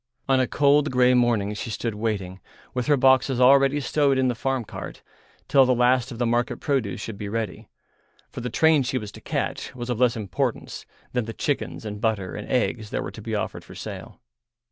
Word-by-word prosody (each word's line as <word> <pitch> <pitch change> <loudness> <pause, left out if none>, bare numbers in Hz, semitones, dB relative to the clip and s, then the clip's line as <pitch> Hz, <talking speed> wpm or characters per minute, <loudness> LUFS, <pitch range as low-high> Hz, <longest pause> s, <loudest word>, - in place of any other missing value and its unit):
On 135 -1 +3
a 130 - +2
cold 145 +1 +3
grey 125 -1 +4
morning 120 -5 +2
she 110 +3 -5
stood 115 +1 -3
waiting, 100 -4 -3 0.3
with 125 -1 -2
her 145 -1 +4
boxes 130 0 +3
already 135 +2 +5
stowed 140 -1 +1
in 130 -1 +2
the - - +1
farm 130 0 -2
cart, - - -8 0.4
till 135 - +6
the 130 -1 +3
last 125 +1 +2
of 120 - -7
the 120 - 0
market 120 +1 0
produce 130 -10 -1
should 105 -1 -7
be 100 - -4
ready, 110 0 -4 0.6
for - - -8
the 125 - -3
train 160 +4 +4
she 130 0 -1
was 105 -4 -5
to - - -13
catch - - -3
was 120 0 -4
of 120 - -2
less 125 -2 +3
importance 100 -5 -3 0.3
than 125 -3 0
the 115 - -6
chickens 145 -4 -3
and 105 -1 -6
butter 105 -6 -1
and 105 - -7
eggs 120 -4 0
that - - -2
were - - -6
to - - -10
be - - -3
offered - - -3
for - - -13
sale. - - -8
125 Hz, 210 wpm, -24 LUFS, 110-130 Hz, 0.6 s, till